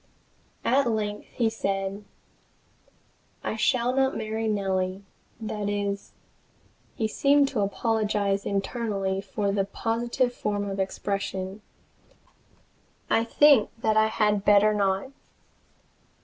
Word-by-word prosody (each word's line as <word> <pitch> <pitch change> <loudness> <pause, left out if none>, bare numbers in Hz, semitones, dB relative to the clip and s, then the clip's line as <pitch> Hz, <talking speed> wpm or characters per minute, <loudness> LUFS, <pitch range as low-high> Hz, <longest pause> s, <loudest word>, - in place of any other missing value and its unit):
At 260 0 +3
length 210 -2 -2
he 235 - 0
said: 195 -2 -2 1.4
"I - - -2
shall 245 +1 +1
not 265 0 +2
marry 220 +1 -2
Nellie 190 -2 -1 0.4
that 210 -2 -3
is" 200 -1 -3 0.8
he 220 - 0
seemed 280 +5 +3
to 250 - -2
apologize 205 -1 0
internally 195 -2 -2
for 200 +1 -2
the 200 0 +1
positive 235 +5 -1
form 205 -3 -2
of 195 0 -4
expression 195 0 -3 1.5
"I 225 - +4
think 275 0 +5
that 220 -1 +1
I 220 0 +5
had 210 -2 +1
better 205 +1 +5
not." 200 +4 0
210 Hz, 105 wpm, -26 LUFS, 200-225 Hz, 1.5 s, think